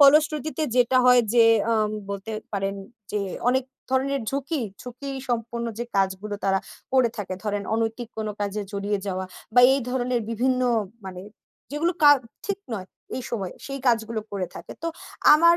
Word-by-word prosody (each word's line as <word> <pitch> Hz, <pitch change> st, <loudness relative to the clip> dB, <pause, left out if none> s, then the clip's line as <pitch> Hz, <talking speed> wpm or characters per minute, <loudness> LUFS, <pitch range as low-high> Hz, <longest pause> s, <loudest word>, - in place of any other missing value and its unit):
ফলশ্রুতিতে 305 Hz, +2 st, +5 dB, 0.2 s
যেটা 250 Hz, +1 st, +5 dB
হয় 250 Hz, -1 st, +7 dB
যে, 235 Hz, -1 st, +7 dB, 0.3 s
আম 215 Hz, -1 st, +2 dB, 0.2 s
বলতে 200 Hz, +2 st, -4 dB, 0.2 s
পারেন 195 Hz, -1 st, -1 dB, 0.4 s
যে 210 Hz, -, +1 dB, 0.3 s
অনেক 260 Hz, 0 st, +3 dB, 0.3 s
ধরনের 270 Hz, +1 st, +1 dB
ঝুঁকি, 280 Hz, +2 st, -1 dB, 0.2 s
ঝুঁকি 250 Hz, +3 st, -7 dB, 0.2 s
সম্পন্ন 235 Hz, 0 st, -1 dB
যে 240 Hz, -, -1 dB
কাজগুলো, 195 Hz, +2 st, 0 dB
তারা 195 Hz, 0 st, +3 dB, 0.3 s
করে 255 Hz, -2 st, +5 dB
থাকে। 195 Hz, -3 st, -3 dB
ধরেন 205 Hz, -1 st, -1 dB
অনৈতিক 225 Hz, +1 st, -1 dB
কোন 220 Hz, -, -1 dB
কাজে 205 Hz, +1 st, -1 dB
জড়িয়ে 200 Hz, 0 st, -1 dB
যাওয়া 190 Hz, -1 st, -2 dB, 0.3 s
বা 245 Hz, -, +8 dB
এই 275 Hz, -, +2 dB
ধরনের 250 Hz, -1 st, 0 dB
বিভিন্ন 255 Hz, +3 st, +1 dB, 0.4 s
মানে, 185 Hz, -1 st, -6 dB, 0.5 s
যেগুলো 325 Hz, +5 st, +1 dB
কা 290 Hz, -, +10 dB, 0.4 s
ঠিক 400 Hz, -1 st, -1 dB, 0.2 s
নয়, 190 Hz, -3 st, -5 dB, 0.3 s
এই 255 Hz, -, -3 dB
সময়ে। 195 Hz, -6 st, -3 dB
সেই 275 Hz, 0 st, -4 dB
কাজগুলো 225 Hz, -2 st, +2 dB
করে 190 Hz, -2 st, -1 dB
থাকে। -, -, -8 dB
তো 335 Hz, -, 0 dB, 0.5 s
আমার 335 Hz, +2 st, +6 dB
235 Hz, 160 wpm, -25 LUFS, 205-265 Hz, 0.5 s, কা